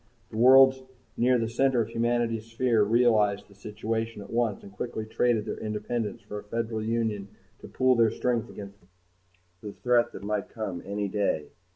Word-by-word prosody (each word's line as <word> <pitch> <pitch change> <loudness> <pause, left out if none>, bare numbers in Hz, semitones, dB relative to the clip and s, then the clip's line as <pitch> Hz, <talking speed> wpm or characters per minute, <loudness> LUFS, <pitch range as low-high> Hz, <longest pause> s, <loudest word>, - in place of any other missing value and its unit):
The 110 - -6
worlds 130 +2 +7 0.3
near 125 +1 +3
the 115 -1 -1
center 130 +2 +1
of 115 -1 0
humanity's 115 -1 -1
sphere 115 -1 +1
realized 105 -2 +2
the 100 - -18
situation 110 +1 -4
at - - -13
once 115 -3 0
and 100 - -11
quickly 110 +1 -5
traded 110 0 +1
their - - -5
independence 110 +1 -3
for 105 - -6
a - - -11
Federal 110 +1 -3
Union 110 -3 -1 0.3
to - - -11
pool 130 0 +2
their 115 -1 +4
strength 120 0 -1
against 100 0 -10 0.8
the 105 -2 -7
threat 120 -1 +2
that - - -9
might 105 -1 -2
come 105 -6 -5
any 100 0 -2
day. 95 -7 -1
110 Hz, 175 wpm, -27 LUFS, 105-120 Hz, 0.8 s, worlds